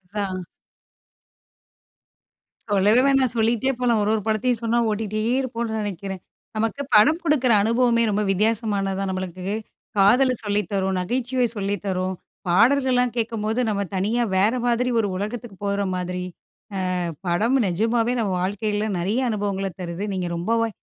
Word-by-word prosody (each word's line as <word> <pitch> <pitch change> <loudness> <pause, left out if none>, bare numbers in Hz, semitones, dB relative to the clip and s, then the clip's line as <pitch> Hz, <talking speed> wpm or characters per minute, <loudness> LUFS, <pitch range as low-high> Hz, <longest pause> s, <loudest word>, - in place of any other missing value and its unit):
ஹான். 190 -3 -2 2.3
சொல்லவே 205 +5 +4
வேணாம். 265 -3 +3
சொல்லிட்டே 235 +4 +2
போலாம், 240 -3 +2
ஒரு 205 - 0
ஒரு 220 - 0
படத்தையும் 225 +2 +1
சொன்னா 230 +1 +1
ஓட்டிட்டே 215 0 -2 0.2
இருப்போம்னு 235 -3 -3
நெனைக்கிறேன். 195 -2 -5 0.3
நமக்கு 225 +6 -1
படம் 310 +11 +6
குடுக்குற 275 -6 +2
அனுபவமே 235 +1 +3
ரொம்ப 210 +1 +1
வித்தியாசமானது 205 -1 0
தான், 195 -1 -1
நம்மளுக்கு 185 -1 -5 0.5
காதல 250 +7 +5
சொல்லி 205 0 +1
தரும், 190 -1 0
நகைச்சுவை 245 +5 0
சொல்லி 200 0 -1
தரும், 185 -1 -1 0.3
பாடல்கள்லாம் 250 +5 +3
கேட்கும்போது 225 0 -1
நம்ம 200 -1 -1
தனியா 220 +6 +1
வேற 205 +4 +4
மாதிரி 245 +1 +1
ஒரு 210 - +1
உலகத்துக்கு 215 +2 -5
போற 200 0 0
மாதிரி, 180 0 -3 0.7
அ - - -1 0.3
படம் 215 +10 +2
நிஜமாவே 225 +6 +1
நம்ம 195 -4 0
வாழ்க்கைல 205 +2 -1
நெறைய 210 +9 0
அனுபவங்கள 200 -2 -2
தருது. 175 +2 -4
நீங்க 180 -2 -2
ரொம்பவே, 230 +6 +1
215 Hz, 135 wpm, -23 LUFS, 195-235 Hz, 2.3 s, படம்